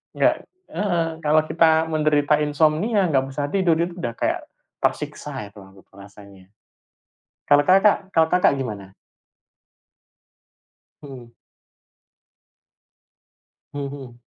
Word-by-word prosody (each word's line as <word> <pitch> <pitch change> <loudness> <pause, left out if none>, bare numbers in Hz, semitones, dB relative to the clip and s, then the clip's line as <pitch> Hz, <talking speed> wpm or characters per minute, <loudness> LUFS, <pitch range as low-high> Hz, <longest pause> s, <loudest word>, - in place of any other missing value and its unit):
Nggak - - +1 0.3
heeh 170 -5 -2
kalau 155 0 +2
kita 160 0 +3
menderita 150 -1 +2
insomnia 155 +8 +1
nggak 135 -2 +1
bisa 140 +2 -4
tidur 185 -4 +2
itu 170 +2 -1
udah 120 -6 -4
kayak, - - -1 0.4
tersiksa 105 - -3
itu 105 - -15
aku 95 0 -17
perasanya. 100 -1 -16 1.0
Kalau 145 0 +5
Kakak 195 +1 +3
kalau 160 0 +4
Kakak 180 -4 +3
gimana? 100 -7 -6 2.1
Hmm. 130 -4 -11 2.4
Hmm 140 -1 -4
hmm. 135 -4 -10
150 Hz, 100 wpm, -22 LUFS, 120-165 Hz, 2.4 s, Kalau